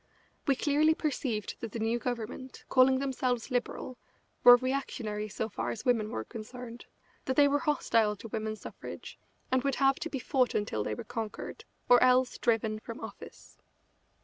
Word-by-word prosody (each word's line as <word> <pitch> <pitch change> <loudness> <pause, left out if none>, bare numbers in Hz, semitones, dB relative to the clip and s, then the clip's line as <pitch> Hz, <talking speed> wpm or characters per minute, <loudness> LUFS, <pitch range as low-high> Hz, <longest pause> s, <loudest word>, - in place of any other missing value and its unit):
We 275 - +4
clearly 305 +3 +3
perceived 250 -9 -2
that 230 -3 -6
the - - -3
new 225 +2 0
Government, 245 +2 -5
calling 260 0 +5
themselves 260 -2 -1
Liberal, 250 0 -3 0.4
were 245 0 +11
reactionary 245 -5 -2
so 220 +2 -3
far 215 - -4
as 220 - -5
women 230 -4 +2
were 110 - -3
concerned, 235 - -9 0.4
that 260 - -1
they 285 +1 +6
were 285 +1 +2
hostile 230 -9 +2
to 210 - -9
women's 215 0 -4
suffrage, - - -9 0.3
and 260 -1 +2
would 275 -2 +1
have 270 -1 +3
to 330 - -4
be 280 - -3
fought 255 -1 +1
until 155 - -1
they 105 - -2
were - - -6
conquered, 225 -2 -6 0.2
or 245 -1 +7
else 255 0 +4
driven 220 -2 +1
from 230 +2 -8
office. - - -11
245 Hz, 170 wpm, -30 LUFS, 220-265 Hz, 0.4 s, were